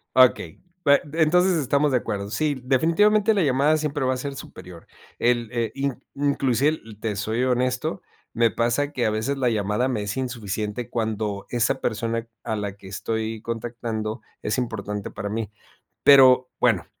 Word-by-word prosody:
Okey. 125 -10 +4 0.2
Bue 140 0 +6
entonces, 175 +3 +3
estamos 145 +1 +2
de 125 - +4
acuerdo. 100 -3 -4
Sí, 145 +2 -1
definitivamente 205 - +3
la 195 - +2
llamada 140 +2 +3
siempre 150 -2 -2
va 130 0 +2
a - - -4
ser 140 +2 -5
superior. 90 -9 -11 0.3
El 120 -1 +1
e 115 -2 -1
in 135 -1 -3
inclusive, 140 +1 +1 0.2
te 110 -2 -2
soy 110 +4 -1
honesto, 125 0 0 0.3
me 115 0 +3
pasa 120 +6 0
que 125 -5 0
a - - +2
veces 110 +6 -1
la 130 -3 +1
llamada 105 +3 0
me 120 -5 -1
es 105 +2 -4
insuficiente, 115 -3 -3
cuando 110 -3 -2
esa 120 -1 +1
persona 115 0 -2 0.2
a 110 -2 -2
la 100 -1 -4
que 100 - -15
estoy 110 +2 -3
contactando 115 -1 -4 0.2
es 105 - -1
importante 105 -4 -3
para 100 - -5
mí. 110 -1 -3 0.5
Pero, 130 -2 +7
bueno. - - +2
120 Hz, 160 wpm, -24 LUFS, 110-140 Hz, 0.5 s, Pero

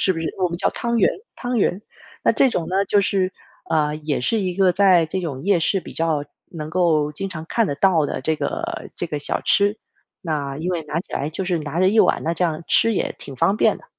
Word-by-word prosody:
是 190 - +3
不 165 - -5
是？ 165 - -2
我 185 -2 +2
们 170 - -4
叫 190 - +2
汤 235 -1 -1
圆 - - +4 0.3
汤 245 -1 -2
圆。 195 -1 +1 0.4
那 - - +4
这 270 - +4
种 170 -8 -2
呢， 195 +2 +1
就 205 - +3
是， 190 -1 0 0.4
呃， 150 -1 +1
也 150 -3 -2
是 220 - +1
一 185 -2 -2
个 185 -1 +3
在 185 -3 +5
这 175 +4 -3
种 140 -7 -5
夜 190 -3 +2
市 195 +4 +1
比 - - -10
较 160 -3 0 0.3
能 155 -3 -6
够 155 -4 +2
经 195 +6 -4
常 160 -4 -7
看 230 +3 +1
得 145 - -2
到 165 -3 +3
的 - - -4
这 155 +2 0
个 335 - -4
这 175 - -3
个 150 -3 -3
小 145 - 0
吃。 205 +1 +3 0.5
那 145 -4 -2
因 170 +4 -2
为 175 -3 -2
拿 150 +2 -2
起 - - -14
来 145 - -1
就 190 +4 -4
是 180 -2 0
拿 155 +2 -3
着 185 - +5
一 220 +3 +2
碗， - - +4
那 165 - 0
这 170 +2 0
样 165 -1 -2
吃 230 - +4
也 - - -1
挺 135 - -9
方 195 +10 +2
便 - - +3
的。 - - -18
175 Hz, 270 characters per minute, -22 LUFS, 155-195 Hz, 0.5 s, 在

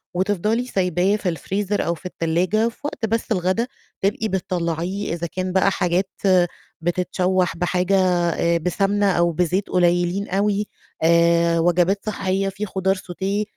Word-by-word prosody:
وتفضلي 205 +5 0
سيباه 185 -3 +1
في 185 -5 -2
الfreezer 200 +6 -2
أو 170 - 0
في 165 - -18
التلاجة 180 +6 0
في 230 - -17
وقت 290 -5 -3
بس 225 +1 -2
الغدا 190 +4 +1 0.3
تبقي 205 +3 0
بتطلعيه 180 -1 -2
إذا 170 0 -3
كان 185 +3 -3
بقى 190 - +3
حاجات 180 +1 0 0.2
آآ 185 -2 +5 0.3
بتتشوّح 180 +1 0
بحاجة 180 +2 +1 0.3
آآ 170 0 +1
بسمنة 195 +4 +1
أو 170 -1 +2
بزيت 180 +4 0
قليلين 175 +2 +1
أوي 205 +2 0 0.4
آآ 170 0 +4
وجبات 175 +4 +2
صحية 195 -2 -1
في 200 +2 -4
خضار 190 -1 0
sauté 190 +3 -3
185 Hz, 140 wpm, -22 LUFS, 175-200 Hz, 0.4 s, آآ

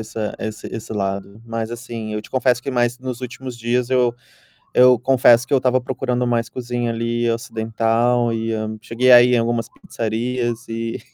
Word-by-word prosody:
essa 110 -1 -4
esse 110 0 -5
esse 110 -1 -7
lado, 100 0 -3
mas 115 -1 -4
assim, 115 -2 -6
eu 105 - -2
te - - -15
confesso 125 -2 +1
que 135 - -3
mais 120 -1 0
nos 130 -2 -6
últimos 125 0 -7
dias 120 +1 -1
eu 125 -2 +2 0.6
eu 125 -1 +6
confesso 120 -1 +4
que - - -2
eu - - +6
estava 130 0 +2
procurando 125 -1 -2
mais 120 -1 0
cozinha 120 -1 -3
ali 115 +1 -1
ocidental, 115 +1 0
e 115 0 -2
hã, 110 0 -3
cheguei 120 +3 +2
a 120 -1 +10
ir 125 +1 +3
em - - +5
algumas 115 -1 -1
pizzarias 120 +1 -3
e, 115 +1 -4
120 Hz, 185 wpm, -20 LUFS, 115-125 Hz, 0.6 s, a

